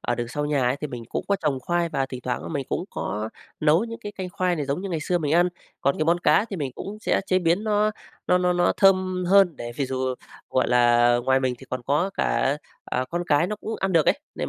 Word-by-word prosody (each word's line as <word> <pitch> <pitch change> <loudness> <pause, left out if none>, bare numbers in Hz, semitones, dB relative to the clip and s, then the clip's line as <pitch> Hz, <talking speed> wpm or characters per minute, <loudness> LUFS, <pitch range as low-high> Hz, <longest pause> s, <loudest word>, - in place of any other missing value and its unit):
ở 120 - -1
đường 120 0 -4
sau 145 +4 -2
nhà 145 -3 +1
ấy 125 +2 +1
thì 150 - -2
mình 120 -4 -7
cũng - - -3
có 200 - +3
trồng 140 -4 0
khoai 175 +4 0
và 135 -4 -1
thỉnh 130 -1 -7
thoảng 125 - -2
á - - -6
mình 140 -5 -3
cũng - - -2
có 105 +2 -3 0.3
nấu 155 +6 +4
những 230 0 -7
cái 205 0 -7
canh 185 -3 -5
khoai 185 -3 0
này 150 - -2
giống 140 +4 -1
như 195 - -4
ngày 165 -4 -2
xưa 175 +4 0
mình 150 -3 -1
ăn. 175 +1 +4 0.3
Còn 140 +1 +1
cái 155 - +1
món 170 +2 +3
cá 165 +3 +4
thì 205 -4 -6
mình 140 -6 -3
cũng 210 +2 -7
sẽ - - +1
chế 185 -1 +3
biến 175 +3 +1
nó 210 0 +2 0.4
nó 180 - +4
nó 180 0 +2
nó 175 0 +2
thơm 185 -2 +3
hơn 195 -4 +5
để 120 0 -6
vì 140 - -1
dù, 130 0 -2 0.4
gọi 130 - +1
là, 120 0 +4
ngoài 130 0 +3
mình 130 -1 0
thì 135 - -13
còn 130 -1 -3
có 150 +9 +1
cả, 135 +2 +1 0.3
à, 125 - -1
con 175 +1 -1
cái 145 +2 +3
nó 210 +3 -3
cũng 220 +2 -5
ăn 190 0 0
được 165 -3 +4
ấy, - - +3 0.2
nên - - -3
160 Hz, 275 wpm, -24 LUFS, 130-185 Hz, 0.4 s, hơn